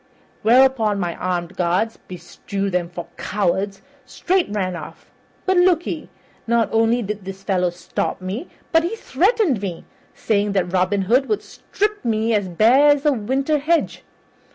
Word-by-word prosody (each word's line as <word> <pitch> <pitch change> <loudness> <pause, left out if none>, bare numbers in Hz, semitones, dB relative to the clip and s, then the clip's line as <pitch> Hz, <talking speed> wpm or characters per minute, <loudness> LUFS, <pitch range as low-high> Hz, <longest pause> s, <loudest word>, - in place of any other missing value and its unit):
Whereupon 230 -3 +4
my 175 -2 -2
armed 175 -1 -3
guards 185 +6 0
beshrew 195 +3 -5
them 175 -1 -1
for 175 -1 -7
cowards! 195 0 -1 0.2
straight 370 0 0
ran 190 -3 -2
away. - - -7 0.5
But 375 -1 +2
look 355 -2 +4
ye; - - -5 0.4
not 235 -1 +2
only 225 +2 +2
did 210 0 -5
this 195 +1 -8
fellow 185 -2 +1
stop 175 0 -4
me, 190 - -5 0.2
but 325 - +5
he 345 +7 -2
threatened 380 - +1
me, 185 -4 -5 0.3
saying 205 -1 0
that 180 -2 -1
Robin 190 +2 +1
Hood 250 +8 +2
would 425 - 0
strip 420 -2 -3
me 225 -1 0
as 200 -3 0
bare 235 - +5
as 290 0 +3
a 295 - +4
winter 270 +6 0
hedge. 330 +4 0
215 Hz, 155 wpm, -21 LUFS, 185-275 Hz, 0.5 s, but